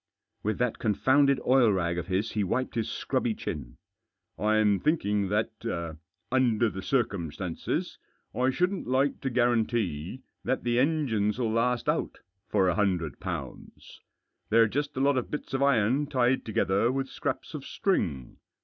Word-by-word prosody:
With 110 +1 -1
that 125 -2 -1
confounded 135 +5 +3
oil 125 -4 +5
rag 85 -3 0
of 85 - -6
his 95 +4 -1
he 105 - 0
wiped 130 +7 -1
his 115 -2 -2
scrubby - - -1
chin. - - -6 0.3
" - - -59 0.3
I'm 105 -2 +3
thinking 105 - +1
that, 110 +3 0 0.8
under 120 -3 +3
the 95 - -6
circumstances, 95 - -2 0.3
I 125 +3 +2
shouldn't 180 +6 0
like 130 +3 +1
to 135 - -1
guarantee 115 - 0 0.2
that 130 +2 -1
the 120 0 +1
engines 125 -8 +1
'11 115 -3 0
last 120 +1 +1
out - - 0 0.3
for 95 -3 +3
a 90 - +3
hundred 90 -6 0
pounds. - - -7 0.5
They're 115 +1 +5
just 145 +5 -3
a - - +1
lot 140 0 +3
of 125 - -6
bits 150 - -5
of 135 - 0
iron 140 +1 +3
tied 130 -2 +1
together 105 +1 +1
with 135 0 -2
scraps - - -4
of - - -6
string. 65 -3 -1
115 Hz, 155 wpm, -28 LUFS, 100-130 Hz, 0.8 s, oil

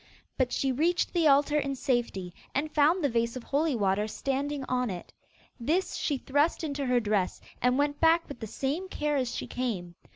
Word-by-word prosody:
But 255 -2 +1
she 270 - +1
reached 330 +7 +1
the 335 -3 +3
altar 290 +1 +4
in 275 -1 -2
safety, 235 -9 -1 0.2
and 300 +3 0
found 315 +4 +3
the 285 - +3
vase 235 0 0
of 255 - -6
holy 290 +2 +1
water 205 -1 +1
standing 275 +4 -2
on 250 -2 0
it. 180 -3 -7 0.5
This 320 +11 0
she 285 - 0
thrust 290 +6 +1
into 285 -3 -2
her 250 -1 +3
dress, 205 -4 0 0.2
and 250 +1 +3
went 290 0 +1
back 330 +1 +4
with 280 - -9
the 220 - -5
same 290 - -3
care 300 -3 -1
as 255 -3 -1
she - - -3
came. 205 -9 -3
275 Hz, 195 wpm, -29 LUFS, 240-295 Hz, 0.5 s, altar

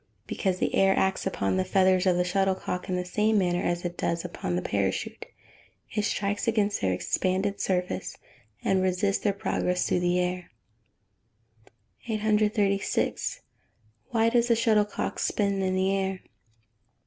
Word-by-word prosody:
_ - - -41 0.2
Because 190 -3 -1
the - - -1
air 195 0 +4
acts 190 0 +1
upon 95 - -1
the 95 - +2
feathers 185 - +3
of 180 -1 +3
the 180 - +3
shuttlecock, 185 0 -1
in 185 - 0
the 180 0 -2
same 210 +4 +1
manner 175 -2 +1
as 175 0 -1
it 175 0 -4
does 170 +1 -1
upon 130 - -3
the 90 - -1
parachute 100 -2 -2 0.6
it 210 - 0
strikes 205 +1 -1
against 210 -2 +1
their 95 - +1
expanded 190 - -1
surface, 180 -1 -2 0.5
and 190 -1 +2
resists 185 +2 +1
their 205 - +3
progress 180 -2 -1
through - - +1
the 175 0 +1
air. 180 0 -2 1.6
836. 210 -2 0 0.7
_Why 230 0 +3
does 240 0 +3
the 235 - +4
shuttlecock 215 -2 +1
spin 200 -2 0
in 185 0 0
the 190 +1 +2
air? 190 -1 -2
190 Hz, 150 wpm, -27 LUFS, 180-205 Hz, 1.6 s, air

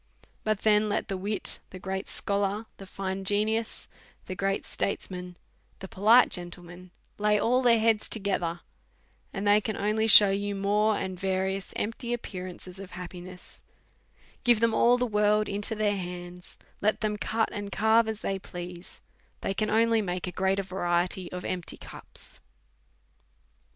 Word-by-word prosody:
But 215 -2 0
then, 210 0 +4
let - - -1
the 195 - -1
wit, 200 +3 -1
the 185 - -9
great 190 +1 -4
scholar, 200 +2 -1
the 195 - -11
fine 190 0 -4
genius, 215 +3 0 0.4
the - - -5
great 195 +1 -1
statesman, 180 -2 -4 0.4
the 190 - -8
polite 220 +6 +5
gentleman, 175 +1 -9 0.3
lay 210 0 +3
all 250 +4 +2
their 240 -2 +5
heads 220 -1 +2
together, 180 -5 -1 0.7
and 200 0 -4
they 205 +1 +5
can 215 0 -3
only 215 +2 +1
shew 205 -2 +9
you 200 +1 -1
more 205 +2 +2
and 185 -1 -4
various 190 0 -1
empty 235 +3 -2
appearances 185 -4 -7
of 195 -2 -10
happiness; 180 0 -9 0.8
give 240 -3 +5
them 230 0 +3
all 240 +2 +5
the 250 - +1
world 210 -1 +2
into 205 +2 -1
their 210 -1 +1
hands, 180 -1 -8 0.2
let 215 +1 +1
them 215 -1 0
cut 220 +3 0
and 205 -1 -5
carve 220 +3 +3
as 220 -1 -4
they 195 0 -2
please, 175 -1 -9 0.4
they 195 - -1
can 215 +2 -1
only 225 +1 +3
make 180 -2 -3
a 180 - -4
greater 190 +1 0
variety 180 -1 -1
of 180 0 -6
empty 180 -2 -4
cups. - - -13
200 Hz, 155 wpm, -28 LUFS, 185-215 Hz, 0.8 s, shew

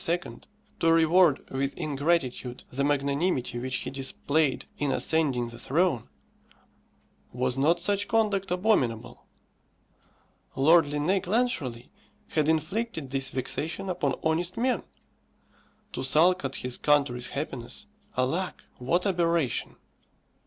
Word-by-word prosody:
to 165 - +3
reward 165 -1 +4
with 135 +1 -2
ingratitude 140 -5 -1
the 140 +2 -1
magnanimity 140 -2 0
which 130 +2 -2
he - - -3
displayed 140 +1 0
in 145 -2 0
ascending 135 -8 +1
the 120 0 -10
throne 150 -1 0 1.2
was 125 0 -1
not 155 +6 +2
such 200 +3 0
conduct 205 -4 +1
abominable? 180 - 0 1.3
Lord 160 +4 +5
Linnæus 150 +7 0
Clancharlie 175 - -1 0.4
had 155 -1 +1
inflicted 160 - -1
this 135 -1 +1
vexation 160 +8 -3
upon 145 -7 0
honest 170 +3 0
men. 250 +2 +1 1.1
To - - -3
sulk 180 +3 +4
at 135 -1 -3
his 125 -1 -2
country's 140 -5 +2
happiness, 135 - -6 0.3
alack, 160 +9 -1 0.2
what 155 +10 0
aberration! 170 - 0
150 Hz, 110 wpm, -27 LUFS, 130-175 Hz, 1.3 s, Lord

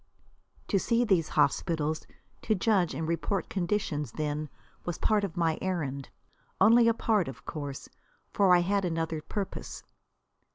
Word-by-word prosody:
To 195 - +3
see 235 +5 +2
these 185 -7 +2
hospitals, 155 +1 0 0.3
to 220 - +1
judge 190 -3 +2
and 160 - -3
report 170 +2 -1
conditions, 175 - -1
then, 150 0 -3 0.3
was 175 - -3
a - - -26
part 210 -2 +2
of 185 -5 -4
my 165 -2 +1
errand. 145 -8 -3 0.5
Only 230 +1 +6
a 230 - +5
part, 215 -6 +1
of 135 - -9
course; 145 -4 -6 0.5
for 195 -2 +4
I 175 - +4
had 200 +3 +1
another 165 -2 -2
purpose. 200 +4 -5
175 Hz, 150 wpm, -29 LUFS, 155-200 Hz, 0.5 s, Only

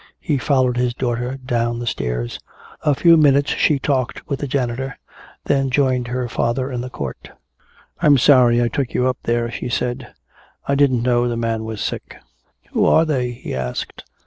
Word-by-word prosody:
He 150 -5 -1
followed 130 -1 +1
his 125 -1 0
daughter 125 +1 -2
down 120 -2 -1
the 120 - -5
stairs. - - -3 0.4
A 150 -3 +2
few 165 +3 +6
minutes 145 -2 +4
she 150 - +2
talked 130 -3 -2
with 140 -2 -3
the 145 - -3
janitor, 130 0 -2 0.5
then 135 -1 +1
joined 130 -2 +1
her 125 0 -2
father 125 +3 -1
in 125 -1 -3
the 125 - -6
court. 70 - -7 0.7
"I'm 145 -2 +6
sorry 125 -3 +5
I - - +2
took 130 +1 -3
you 125 - +2
up 130 -1 -1
there," 120 0 0
she 120 - -5
said. 120 0 -3 0.6
"I 140 - +1
didn't 135 -4 +3
know 120 -1 +2
the 120 -1 -2
man 115 -1 -2
was 110 -2 -5
sick." - - -5 0.5
"Who - - +1
are 160 - +5
they?" 130 -6 0
he 120 +1 -7
asked. 65 -1 -4
125 Hz, 180 wpm, -20 LUFS, 120-135 Hz, 0.7 s, few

